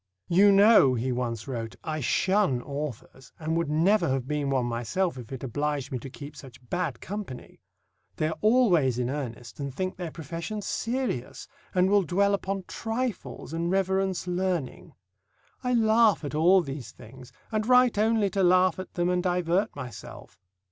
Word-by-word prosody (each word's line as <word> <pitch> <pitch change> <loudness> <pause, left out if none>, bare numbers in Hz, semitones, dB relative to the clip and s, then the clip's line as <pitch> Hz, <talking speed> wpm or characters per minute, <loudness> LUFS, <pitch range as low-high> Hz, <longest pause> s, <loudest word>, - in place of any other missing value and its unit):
"You 195 +4 +6
know," 200 - +6
he 125 +2 -1
once 120 -2 -3
wrote, 115 -4 -5
"I 155 -1 -3
shun 185 - +2
authors, 140 -2 -7
and 160 0 -2
would 165 -2 0
never 175 +7 +3
have 130 -1 -1
been 150 -1 -1
one 130 -3 +1
myself 120 +10 -1
if 125 -2 -10
it 130 -1 -6
obliged 145 +2 -2
me 130 - -2
to 135 - -8
keep 145 +2 -10
such 130 -3 -13
bad 165 -9 -2
company. 195 -10 -7 0.5
They 155 - 0
are 160 - -5
always 185 - +3
in 125 0 -1
earnest 125 -4 -6
and 140 -1 -3
think 185 +7 -4
their 175 -2 -4
profession 165 +7 -6
serious, 235 - -3 0.3
and 180 0 +4
will 205 +1 +4
dwell 200 +3 +1
upon 195 -1 -2
trifles 225 - -4
and 170 +1 -1
reverence 190 0 0
learning. 180 -5 -3 0.7
I 250 0 +1
laugh 220 -5 +4
at 140 - -5
all 175 +5 +5
these 135 -3 -7
things, 125 +3 -14 0.2
and 215 0 -1
write 250 -3 +5
only 220 -2 +2
to 195 - 0
laugh 185 0 +4
at 185 - -8
them 175 0 +1
and 180 0 +1
divert 180 +2 0
myself. 125 -9 -9
170 Hz, 170 wpm, -27 LUFS, 135-195 Hz, 0.7 s, You